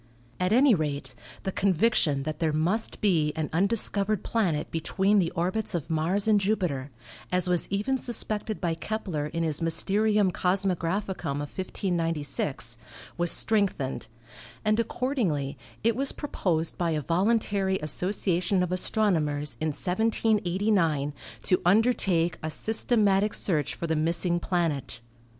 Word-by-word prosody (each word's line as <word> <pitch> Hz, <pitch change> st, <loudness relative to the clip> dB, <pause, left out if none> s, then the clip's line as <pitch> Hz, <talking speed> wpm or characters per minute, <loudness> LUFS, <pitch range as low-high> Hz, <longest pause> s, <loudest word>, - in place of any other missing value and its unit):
At 180 Hz, +1 st, +1 dB
any 255 Hz, +3 st, +6 dB
rate, 145 Hz, -6 st, -2 dB, 0.3 s
the 190 Hz, -, -2 dB
conviction 185 Hz, -7 st, +2 dB
that 155 Hz, +1 st, -4 dB
there 160 Hz, -2 st, +1 dB
must 175 Hz, +9 st, 0 dB
be 165 Hz, -7 st, +2 dB
an 160 Hz, -1 st, -2 dB
undiscovered 200 Hz, +2 st, +1 dB
planet 175 Hz, -10 st, 0 dB
between 190 Hz, +5 st, +2 dB
the 170 Hz, -3 st, +1 dB
orbits 185 Hz, +4 st, -1 dB
of 165 Hz, -1 st, -4 dB
Mars 175 Hz, +7 st, +1 dB
and 215 Hz, -2 st, +5 dB
Jupiter, 180 Hz, -10 st, -1 dB, 0.4 s
as 180 Hz, 0 st, +1 dB
was 180 Hz, -1 st, +1 dB
even 210 Hz, +7 st, 0 dB
suspected 215 Hz, -3 st, -2 dB
by 170 Hz, -3 st, 0 dB
Kepler 165 Hz, -4 st, -3 dB
in 165 Hz, +2 st, -3 dB
his 155 Hz, -1 st, -1 dB
"Mysterium 200 Hz, +4 st, +2 dB
Cosmographicum" 185 Hz, -2 st, -1 dB
of 145 Hz, 0 st, -6 dB
1596, 165 Hz, -, -2 dB, 0.4 s
was 175 Hz, -1 st, +3 dB
strengthened, 195 Hz, -, 0 dB, 0.6 s
and 215 Hz, +1 st, +2 dB
accordingly 210 Hz, -, -1 dB, 0.3 s
it 230 Hz, 0 st, +3 dB
was 270 Hz, +2 st, 0 dB
proposed 170 Hz, -, -2 dB
by 175 Hz, -1 st, +1 dB
a 155 Hz, -2 st, 0 dB
voluntary 195 Hz, -, +1 dB
association 180 Hz, +3 st, 0 dB
of 180 Hz, -, -3 dB
astronomers 160 Hz, -7 st, 0 dB
in 160 Hz, -, +1 dB
1789 185 Hz, -4 st, +1 dB, 0.3 s
to 180 Hz, -, +2 dB
undertake 180 Hz, -5 st, +2 dB
a 155 Hz, -, -3 dB
systematic 210 Hz, +1 st, +1 dB
search 150 Hz, -7 st, 0 dB
for -, -, -4 dB
the 160 Hz, -1 st, 0 dB
missing 170 Hz, +2 st, +1 dB
planet. 165 Hz, -10 st, -2 dB
180 Hz, 130 wpm, -27 LUFS, 160-210 Hz, 0.6 s, any